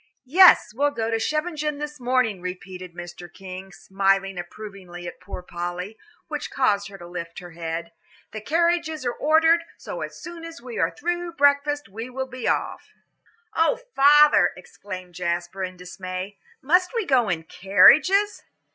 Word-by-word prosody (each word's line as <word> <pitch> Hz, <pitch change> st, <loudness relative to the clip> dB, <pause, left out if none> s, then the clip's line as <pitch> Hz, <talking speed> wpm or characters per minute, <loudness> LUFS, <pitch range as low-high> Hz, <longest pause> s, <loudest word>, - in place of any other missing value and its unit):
"Yes, 350 Hz, -, +7 dB
we'll 285 Hz, +5 st, +2 dB
go 230 Hz, -5 st, -3 dB
to 225 Hz, -, +1 dB
Scheveningen 305 Hz, +3 st, -1 dB
this 295 Hz, 0 st, -6 dB
morning," 245 Hz, -6 st, +1 dB
repeated 185 Hz, -1 st, -7 dB
Mr. 175 Hz, 0 st, -9 dB
King, 190 Hz, +1 st, -9 dB
smiling 195 Hz, 0 st, 0 dB
approvingly 180 Hz, -1 st, -9 dB
at -, -, -8 dB
poor 190 Hz, -2 st, -8 dB
Polly, 175 Hz, +4 st, -5 dB, 0.3 s
which -, -, -4 dB
caused 205 Hz, -6 st, +1 dB
her 195 Hz, 0 st, -11 dB
to 175 Hz, -, -11 dB
lift 170 Hz, -1 st, -7 dB
her 175 Hz, -2 st, -9 dB
head; 165 Hz, 0 st, -5 dB, 0.4 s
"the 215 Hz, -, -6 dB
carriages 325 Hz, +1 st, 0 dB
are 245 Hz, -, 0 dB
ordered, 325 Hz, +2 st, +4 dB
so -, -, -7 dB
as -, -, -6 dB
soon 345 Hz, -1 st, -9 dB
as 330 Hz, 0 st, -9 dB
we 240 Hz, -1 st, -7 dB
are -, -, +3 dB
through 350 Hz, +2 st, -3 dB
breakfast 285 Hz, 0 st, +2 dB
we 225 Hz, +5 st, -7 dB
will 265 Hz, +1 st, -4 dB
be 255 Hz, -1 st, -6 dB
off." -, -, -1 dB, 0.6 s
"Oh, 425 Hz, +8 st, +2 dB, 0.2 s
father," 295 Hz, +2 st, +6 dB
exclaimed 185 Hz, 0 st, -9 dB
Jasper, 175 Hz, +2 st, -3 dB
in 185 Hz, 0 st, -5 dB
dismay, 185 Hz, +2 st, -7 dB, 0.2 s
"must 360 Hz, -, +2 dB
we 455 Hz, -4 st, 0 dB
go 250 Hz, -, +3 dB
in 165 Hz, -3 st, -1 dB
carriages?" 300 Hz, -, +5 dB
215 Hz, 155 wpm, -24 LUFS, 180-295 Hz, 0.6 s, Yes